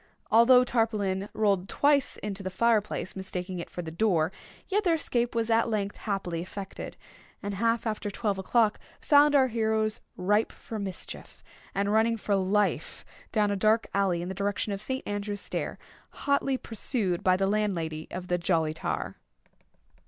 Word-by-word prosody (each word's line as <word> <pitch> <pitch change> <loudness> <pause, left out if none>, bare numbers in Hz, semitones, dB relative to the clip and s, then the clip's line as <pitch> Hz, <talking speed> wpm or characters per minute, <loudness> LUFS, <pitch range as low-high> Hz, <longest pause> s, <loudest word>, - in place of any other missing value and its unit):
Although 250 +3 +7
Tarpaulin 210 -5 0
rolled 200 -3 +1
twice 285 -1 +2
into 200 -1 -3
the 190 - -3
fire 225 +3 +3
place, 195 -2 -5
mistaking 185 -1 -4
it 170 - -6
for 175 - -6
the 160 - -6
door, 170 -3 +2 0.4
yet 415 +2 +1
their 345 -4 +3
escape 240 -6 0
was 230 0 0
at 230 +1 +3
length 205 -2 -1
happily 190 -5 -3
effected—and 200 +2 -8
half 230 +3 +1
after 215 -2 -2
twelve 200 -1 -1
o'clock 215 +2 +2 0.2
found 290 -1 +5
our 270 -2 +6
heroes 220 -2 0 0.2
ripe 205 +4 +2
for 220 - -7
mischief, 195 -3 -6 0.3
and 200 +1 +1
running 225 +1 +3
for 210 -1 -1
life 200 +2 0 0.3
down 210 -2 +2
a - - +1
dark 215 +3 +3
alley 190 -4 +1
in - - -5
the 190 - -3
direction 200 +2 -1
of 195 - -5
St. 260 +4 -4
Andrew's 205 0 -3
Stair, - - -3 0.5
hotly 280 -1 +2
pursued 215 -6 -2
by 185 0 +4
the 195 - +1
landlady 180 -7 -1
of 180 0 -6
the 180 0 0
"Jolly 165 -3 +1
Tar." 160 - -3
205 Hz, 165 wpm, -28 LUFS, 190-230 Hz, 0.5 s, Although